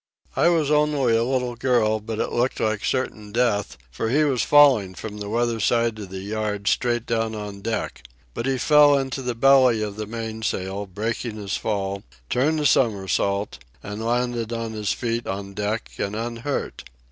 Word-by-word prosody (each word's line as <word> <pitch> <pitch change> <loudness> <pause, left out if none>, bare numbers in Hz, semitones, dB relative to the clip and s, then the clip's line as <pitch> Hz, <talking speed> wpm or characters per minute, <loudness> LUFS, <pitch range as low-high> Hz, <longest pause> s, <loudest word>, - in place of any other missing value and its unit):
I - - +4
was 160 -4 +2
only 150 -5 +3
a 115 - +2
little 125 -1 -1
girl, 115 -3 +2
but 110 +1 -5
it - - -2
looked 125 +2 0
like 110 -1 0
certain 105 -5 -2
death, 110 - 0
for 110 - -2
he 145 +6 +3
was 135 -5 +1
falling 130 -11 +5
from 105 +4 -7
the 100 0 -5
weather 115 +1 0
side 115 0 +1
of 100 -3 -7
the 95 0 -6
yard 105 0 -3
straight 120 -1 +1
down 115 -1 -1
on 105 -2 -7
deck. 115 - -3 0.3
But 115 - -3
he 135 -1 +1
fell 145 0 +6
into 135 -1 -3
the 125 -2 -3
belly 130 -3 +5
of 105 -1 -5
the 110 -1 -4
mainsail, 110 -3 -4
breaking 110 +4 -3
his 105 -2 -3
fall, 100 -2 -2 0.3
turned 150 +5 +2
a 150 - -1
somersault, 100 -5 +1 0.2
and 105 +2 -6
landed 120 -1 -1
on 115 -1 -3
his 105 -2 -1
feet 115 -1 -2
on 100 0 -5
deck 105 +3 -3
and 100 +1 -2
unhurt. 115 +5 -4
115 Hz, 180 wpm, -23 LUFS, 105-125 Hz, 0.3 s, fell